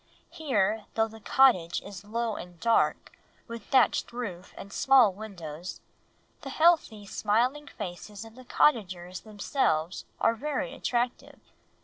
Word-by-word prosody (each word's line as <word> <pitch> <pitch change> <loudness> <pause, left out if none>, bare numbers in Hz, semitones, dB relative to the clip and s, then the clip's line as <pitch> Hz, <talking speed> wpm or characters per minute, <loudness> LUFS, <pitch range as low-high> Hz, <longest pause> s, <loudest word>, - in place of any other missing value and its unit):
Here, 240 - 0
though 225 0 +2
the 225 0 -13
cottage 205 -7 +3
is 200 -2 -9
low 225 +1 -2
and 175 -1 -10
dark, 230 -1 +1 0.3
with 230 -3 -8
thatched 260 -2 +3
roof 200 -7 -6
and 200 - -9
small 260 -7 +5
windows, 180 -5 -8 0.6
the 280 - -7
healthy, 310 -9 +3
smiling 245 +9 0
faces 200 +2 -8
of 225 - -13
the 255 +2 -13
cottagers 185 -11 +1
themselves 200 - -1
are - - +3
very 275 +1 -3
attractive. 245 -2 -2
220 Hz, 125 wpm, -28 LUFS, 190-255 Hz, 0.6 s, small